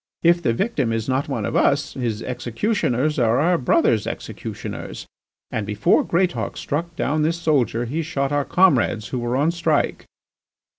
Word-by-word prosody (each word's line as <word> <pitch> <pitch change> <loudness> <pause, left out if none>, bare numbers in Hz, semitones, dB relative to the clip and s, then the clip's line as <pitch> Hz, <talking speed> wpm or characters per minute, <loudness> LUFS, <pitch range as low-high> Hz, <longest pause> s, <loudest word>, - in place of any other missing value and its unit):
If 170 +1 +4
the 120 - +1
victim 140 - 0
is 115 -1 -2
not 135 +2 0
one 115 -7 -2
of - - -3
us, 140 +1 +2
his 115 -4 -3
executioners 125 - -1
are 115 0 +3
our 175 +5 +3
brothers' 115 -3 +2
executioners, - - -6 0.5
and 110 - -2
before 105 +1 +2
Greatauk 180 +1 -1
struck 165 +3 -3
down 155 0 0
this 165 +2 +1
soldier 130 -7 +1
he 150 +8 -2
shot 140 -4 -2
our 145 0 +1
comrades 130 - +2
who 125 - -2
were 120 +1 -1
on 150 +4 +2
strike. 165 -3 0
140 Hz, 160 wpm, -22 LUFS, 120-165 Hz, 0.5 s, If